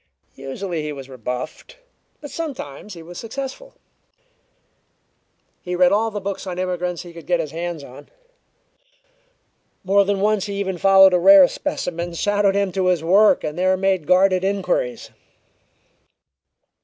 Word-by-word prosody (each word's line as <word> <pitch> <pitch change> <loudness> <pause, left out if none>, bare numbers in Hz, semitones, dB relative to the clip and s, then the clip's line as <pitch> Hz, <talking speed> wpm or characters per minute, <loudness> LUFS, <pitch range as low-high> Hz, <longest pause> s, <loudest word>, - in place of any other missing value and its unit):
Usually 160 +6 -5
he 150 0 -4
was 135 -2 -9
rebuffed, 125 - -7 0.4
but 290 - -9
sometimes 210 - -7
he 165 - -11
was 175 +1 -10
successful. 275 - -7 1.9
He 180 0 -4
read 180 0 +4
all 220 +2 +2
the 210 -1 -5
books 195 0 -5
on 180 -1 -5
immigrants 180 -1 -3
he 175 -1 -12
could 170 -1 -12
get 175 -1 +1
his 155 -3 -4
hands 170 -2 -5
on. - - -13 1.7
More 200 +2 +3
than 200 0 -1
once 210 0 +1
he 200 - -5
even 190 -3 -3
followed 195 0 +6
a 180 - +3
rare 290 +7 +8
specimen 175 - -4
shadowed 205 +1 +1
him 200 -1 0
to 185 0 -1
his 180 -3 +1
work 200 +5 +4
and 155 +3 -4
there 185 +1 +2
made 190 -4 0
guarded 185 0 +3
inquiries. - - -2
185 Hz, 145 wpm, -21 LUFS, 170-200 Hz, 1.9 s, rare